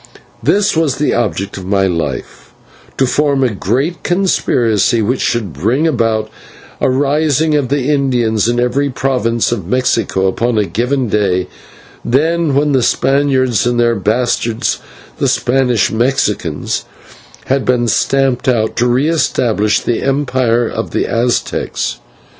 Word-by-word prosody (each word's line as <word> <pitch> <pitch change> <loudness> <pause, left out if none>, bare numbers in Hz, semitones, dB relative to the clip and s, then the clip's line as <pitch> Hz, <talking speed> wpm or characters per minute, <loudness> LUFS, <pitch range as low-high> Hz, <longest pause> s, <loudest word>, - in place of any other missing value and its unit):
This 205 -2 +2
was 160 -4 +1
the 150 - 0
object 100 -4 -2
of 95 - -7
my 95 0 +2
life 85 -7 -4 0.4
to 135 - +3
form 140 +1 +1
a 125 -4 +1
great 130 - -1
conspiracy, 120 - +1
which 125 +5 -1
should 110 -8 -1
bring 115 - 0
about 115 -7 0 0.5
a - - +1
rising 145 +3 +1
of 145 -4 0
the 140 -1 0
Indians 120 -6 +1
in 120 0 0
every 130 +4 0
province 125 -4 0
of 100 -8 -3
Mexico 115 -5 0
upon 115 +5 0
a 105 - +2
given 125 +8 -1
day; 95 -4 0 0.6
then, 160 +3 +1
when 145 +1 +2
the 135 -2 +2
Spaniards 130 -4 +1
and 120 0 0
their 120 0 +3
bastards, 115 +2 -1 0.4
the - - +1
Spanish 125 -4 +1
Mexicans, 110 - -1 0.6
had 135 0 0
been 125 -1 +1
stamped 135 +3 +1
out, 110 -4 +1
to 120 - +2
re 125 +5 +2
establish 115 -9 +1
the 120 - -1
Empire 130 -4 +1
of - - -4
the - - -1
Aztecs. 120 - -1
120 Hz, 140 wpm, -15 LUFS, 110-135 Hz, 0.6 s, to